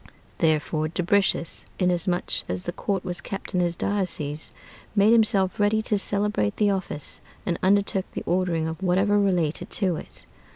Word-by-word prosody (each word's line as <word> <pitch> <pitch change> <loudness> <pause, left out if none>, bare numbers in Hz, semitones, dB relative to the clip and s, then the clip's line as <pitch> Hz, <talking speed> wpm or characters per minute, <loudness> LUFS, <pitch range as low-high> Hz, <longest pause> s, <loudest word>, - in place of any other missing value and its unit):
Therefore 155 -1 +1
Dubricius, 180 +1 0
inasmuch 180 -1 0 0.2
as 90 0 -1
the - - -3
court 195 -2 -2
was 180 -1 -3
kept 195 - -6
in 180 - +2
his 175 -1 +1
diocese, 165 -7 -2 0.4
made 210 +2 +5
himself 210 -5 +3
ready 215 +1 +2
to 210 -2 +1
celebrate 200 - +1
the 205 -1 +3
office, 185 -6 -4 0.2
and 170 -2 -1
undertook 195 0 +2
the - - -4
ordering 175 -3 +1
of 160 +1 -5
whatever 195 +3 +3
related 180 -6 0
to 185 -5 0
it. - - -11
185 Hz, 155 wpm, -25 LUFS, 170-200 Hz, 0.4 s, made